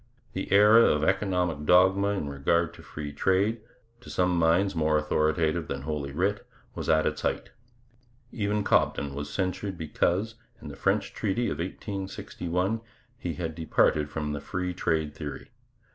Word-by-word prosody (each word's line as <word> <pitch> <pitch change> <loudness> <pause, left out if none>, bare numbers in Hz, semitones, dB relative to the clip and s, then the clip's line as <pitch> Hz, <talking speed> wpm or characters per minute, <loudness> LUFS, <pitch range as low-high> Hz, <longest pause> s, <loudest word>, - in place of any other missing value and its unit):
The - - -4
era 105 +3 +7
of 75 0 +2
economic 90 -4 0
dogma 95 +2 +5
in 100 -7 -1
regard 85 +4 0
to - - -13
free 75 -1 -7
trade, 100 +8 +1 0.4
to - - -13
some 90 -1 +1
minds 85 +4 +3
more 80 -2 +2
authoritative 80 +2 +1
than 70 -2 -4
Holy 70 -2 -3
Writ, 95 +7 0 0.3
was - - -5
at 80 0 +4
its - - -1
height. - - -2 0.8
Even 105 -2 -1
Cobden 70 -7 +1
was 70 +1 -5
censured 95 0 -2
because, 90 +6 0 0.3
in - - -9
the - - -8
French - - 0
treaty 120 +5 -1
of - - -4
1861, 95 +1 -3 0.3
he 85 -9 -5
had 80 0 -4
departed 75 -2 +1
from 75 -1 -3
the 75 - -4
free 90 -1 -3
trade 80 -4 -1
theory. 75 -3 -7
85 Hz, 155 wpm, -27 LUFS, 75-95 Hz, 0.8 s, era